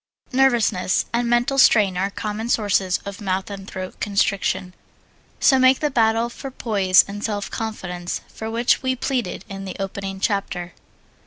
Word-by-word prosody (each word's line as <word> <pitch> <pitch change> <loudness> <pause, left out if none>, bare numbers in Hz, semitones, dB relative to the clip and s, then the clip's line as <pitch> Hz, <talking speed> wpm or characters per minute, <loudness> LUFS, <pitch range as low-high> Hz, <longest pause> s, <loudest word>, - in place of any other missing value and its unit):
Nervousness 240 -8 +2
and 235 0 0
mental 240 +3 +2
strain 205 -7 +5
are 190 +2 0
common 215 +3 -4
sources 200 -5 +2
of 200 +1 -7
mouth 190 0 -2
and 195 -1 -8
throat 185 0 -7
constriction, 200 -2 0 0.7
so 265 -2 +5
make 260 0 +5
the 300 -1 0
battle 225 -1 +2
for 270 +3 -8
poise 200 -7 +3
and 205 +1 -7
self 205 -2 -3
confidence 180 -6 -4
for 220 - -7
which 235 +2 +2
we 260 -1 0
pleaded 245 -8 -3
in 195 0 -7
the 190 -1 -6
opening 195 0 -4
chapter. 190 -3 -2
205 Hz, 155 wpm, -22 LUFS, 195-235 Hz, 0.7 s, strain